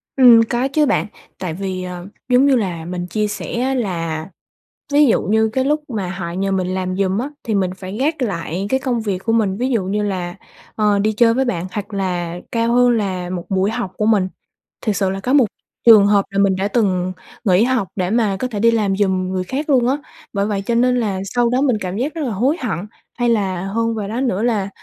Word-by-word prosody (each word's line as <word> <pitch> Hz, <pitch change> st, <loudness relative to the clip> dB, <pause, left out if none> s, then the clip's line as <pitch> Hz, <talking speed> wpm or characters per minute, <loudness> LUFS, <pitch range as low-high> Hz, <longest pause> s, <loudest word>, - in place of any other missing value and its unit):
Ừm, 245 Hz, -4 st, +8 dB
có 245 Hz, +2 st, +1 dB
chứ 300 Hz, +2 st, +2 dB
bạn -, -, +1 dB, 0.3 s
tại 180 Hz, -4 st, -3 dB
vì, 185 Hz, +1 st, -4 dB
ờ, 180 Hz, 0 st, -7 dB, 0.2 s
giống 250 Hz, +2 st, +5 dB
như 280 Hz, -2 st, +4 dB
là 180 Hz, -8 st, -2 dB
mình 175 Hz, 0 st, -4 dB
chia 210 Hz, +3 st, -1 dB
sẻ 235 Hz, +3 st, -4 dB
á 265 Hz, +1 st, 0 dB
là, 165 Hz, -9 st, -2 dB, 0.7 s
ví 295 Hz, +1 st, +6 dB
dụ 230 Hz, -, +3 dB
như 220 Hz, +2 st, +2 dB
cái 260 Hz, -, +1 dB
lúc 300 Hz, +2 st, +1 dB
mà 205 Hz, -7 st, -3 dB
họ 180 Hz, -2 st, -5 dB
nhờ 195 Hz, +3 st, -1 dB
mình 185 Hz, -2 st, 0 dB
làm 185 Hz, 0 st, -2 dB
giùm 195 Hz, -1 st, +1 dB
á, 260 Hz, +4 st, -3 dB
thì 220 Hz, -, -1 dB
mình 190 Hz, -2 st, +1 dB
phải 190 Hz, +2 st, -7 dB
gác 295 Hz, +3 st, 0 dB
lại 185 Hz, -4 st, -2 dB
cái 265 Hz, -, +2 dB
công 250 Hz, -3 st, -1 dB
việc 205 Hz, -4 st, -1 dB
của 225 Hz, -, +1 dB
mình, 205 Hz, -4 st, +1 dB
ví 250 Hz, +3 st, -1 dB
dụ 230 Hz, -7 st, +1 dB
như 205 Hz, +2 st, -1 dB
là, 180 Hz, -3 st, -3 dB, 0.4 s
ờ, 210 Hz, -2 st, +2 dB
đi 215 Hz, +2 st, +2 dB
chơi 230 Hz, +1 st, +4 dB
với 265 Hz, +3 st, +1 dB
bạn 180 Hz, -8 st, -2 dB
hoặc 210 Hz, 0 st, -5 dB
là 175 Hz, -3 st, -2 dB
cao 230 Hz, 0 st, +1 dB
hơn 245 Hz, 0 st, +5 dB
là 190 Hz, -6 st, -1 dB
một 180 Hz, -1 st, -4 dB
buổi 190 Hz, +1 st, +1 dB
học 230 Hz, -5 st, -3 dB
của 210 Hz, -, 0 dB
mình. 210 Hz, -4 st, +3 dB, 0.6 s
Thiệt 215 Hz, -3 st, +1 dB
sự 195 Hz, -1 st, +1 dB
là 195 Hz, +1 st, -3 dB
có 250 Hz, +7 st, -1 dB
một 280 Hz, -4 st, +6 dB, 0.4 s
trường 220 Hz, -4 st, +8 dB
hợp 205 Hz, -1 st, +3 dB
là 195 Hz, -, -2 dB
mình 195 Hz, -1 st, +3 dB
đã 190 Hz, +2 st, -1 dB
từng 185 Hz, -5 st, 0 dB, 0.3 s
nghỉ 190 Hz, +1 st, +4 dB
học 250 Hz, -5 st, +1 dB
để 180 Hz, -2 st, -1 dB
mà 215 Hz, -3 st, +1 dB
có 255 Hz, -, -1 dB
thể 220 Hz, -5 st, -5 dB
đi 230 Hz, +2 st, +4 dB
làm 205 Hz, -4 st, +1 dB
giùm 190 Hz, -2 st, +1 dB
người 185 Hz, -1 st, -1 dB
khác 275 Hz, -, -4 dB
luôn 250 Hz, -4 st, +4 dB
á, 270 Hz, +3 st, +2 dB, 0.4 s
bởi 200 Hz, -1 st, 0 dB
vậy 205 Hz, -2 st, -1 dB
cho 235 Hz, -, 0 dB
nên 250 Hz, +1 st, +3 dB
là 200 Hz, -5 st, -1 dB
sau 240 Hz, +4 st, +1 dB
đó 250 Hz, +2 st, +1 dB
mình 260 Hz, -6 st, +2 dB
cảm 185 Hz, +1 st, -3 dB
giác 270 Hz, +6 st, -2 dB
rất 330 Hz, -, -5 dB
là 255 Hz, -, -2 dB
hối 255 Hz, -, +1 dB
hận. 225 Hz, -, -2 dB, 0.4 s
Hay 240 Hz, 0 st, +1 dB
là 190 Hz, -5 st, 0 dB
hơn 230 Hz, +3 st, -1 dB
vào 210 Hz, -2 st, -3 dB
đó 230 Hz, +5 st, -3 dB
nữa 225 Hz, -6 st, 0 dB
là, 215 Hz, -5 st, 0 dB
210 Hz, 245 wpm, -19 LUFS, 190-240 Hz, 0.7 s, Ừm